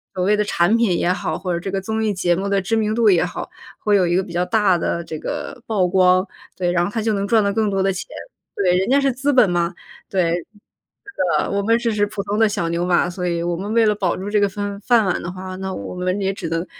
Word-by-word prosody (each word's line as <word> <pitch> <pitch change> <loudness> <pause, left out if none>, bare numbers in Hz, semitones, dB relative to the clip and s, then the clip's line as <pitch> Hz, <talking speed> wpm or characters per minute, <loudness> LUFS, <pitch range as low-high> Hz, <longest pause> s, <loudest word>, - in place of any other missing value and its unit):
所 180 - -1
谓 205 +3 +3
的 210 - +1
产 200 0 +2
品 225 -7 +2
也 180 - +1
好， - - -3
或 180 -1 -3
者 170 - -1
这 185 - -5
个 195 - -1
综 220 +3 -2
艺 215 - +1
节 180 -3 +1
目 195 +3 -2
的 200 0 +2
知 195 +4 -1
名 215 -1 0
度 230 -1 +3
也 175 - +3
好， 175 - -5 0.3
会 210 -1 +1
有 185 -3 +3
一 170 - +1
个 190 - +2
比 170 - -10
较 175 +1 +1
大 205 -4 +2
的 170 +1 -2
这 160 -2 -7
个 290 - -5
曝 200 -5 +1
光。 185 +1 +3 0.3
对， 180 -1 0
然 175 -1 +2
后 175 - -2
他 225 0 -2
就 220 0 +1
能 200 0 -1
赚 220 0 +3
到 200 0 0
更 220 0 +1
多 195 -1 0
的 195 0 +1
钱。 185 - -6 0.5
对， 185 -3 +2
人 190 - 0
家 280 +2 +4
是 275 -1 +2
资 270 +3 0
本 250 -7 +5
嘛， 175 0 0 0.4
对， 180 -4 +1
是 175 0 -1 1.0
的， - - -4
我 200 0 0
们 225 +3 +3
只 235 -1 -1
是 205 -1 +2
普 205 -1 -5
通 205 +2 -2
的 225 - +5
小 175 -5 -2
牛 170 +1 -1
马， 175 -1 +2
所 180 0 -4
以 170 -1 -1
我 175 0 -1
们 200 +4 -5
为 230 -1 +4
了 210 - +3
保 190 -4 -1
住 195 +2 -5
这 210 0 +2
个 200 - +3
饭 200 0 -5
饭 230 +2 +3
碗 185 - 0
的 175 - -5
话， 185 +1 -7
那 190 0 -4
我 100 - -6
们 185 +2 -2
也 195 0 +1
只 190 -3 -6
能 165 +1 -2
195 Hz, 305 characters per minute, -20 LUFS, 180-210 Hz, 1.0 s, 本